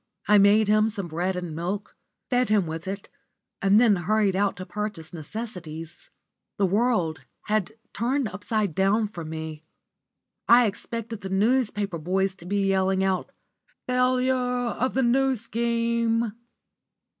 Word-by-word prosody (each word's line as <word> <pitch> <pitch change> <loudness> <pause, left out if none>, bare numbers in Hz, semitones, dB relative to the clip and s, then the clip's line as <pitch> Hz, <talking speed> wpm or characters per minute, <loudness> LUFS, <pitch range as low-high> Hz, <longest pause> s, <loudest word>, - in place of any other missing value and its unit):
I 210 0 +6
made 205 +2 +5
him 215 +1 +4
some 200 -4 -5
bread 175 +4 -2
and 175 -3 -5
milk, 185 +5 -4 0.4
fed 250 -1 +2
him 210 -4 +3
with 160 +2 -6
it, 195 +1 -5 0.5
and 195 +2 +5
then 225 -5 +5
hurried 205 +2 +1
out 200 +1 +1
to 185 - -6
purchase 210 -6 -5
necessaries. 170 - -7 0.5
The 200 - +3
world, 190 - +1 0.2
had 215 -1 -1 0.2
turned 255 +3 0
upside 205 -1 -2
down 200 +4 +2
for 175 -5 -7
me. 160 -1 -6 0.9
I 240 +1 +8
expected 225 +1 -5
the 190 - -5
newspaper 205 -3 +1
boys 190 +4 0
to 170 - -13
be 200 +1 0
yelling 190 0 +2
out 190 -1 -1 0.5
"Failure 250 +1 +2
of 250 0 -1
the 265 - +2
New 265 +2 +3
Scheme!" 230 0 0
205 Hz, 140 wpm, -25 LUFS, 185-230 Hz, 0.9 s, I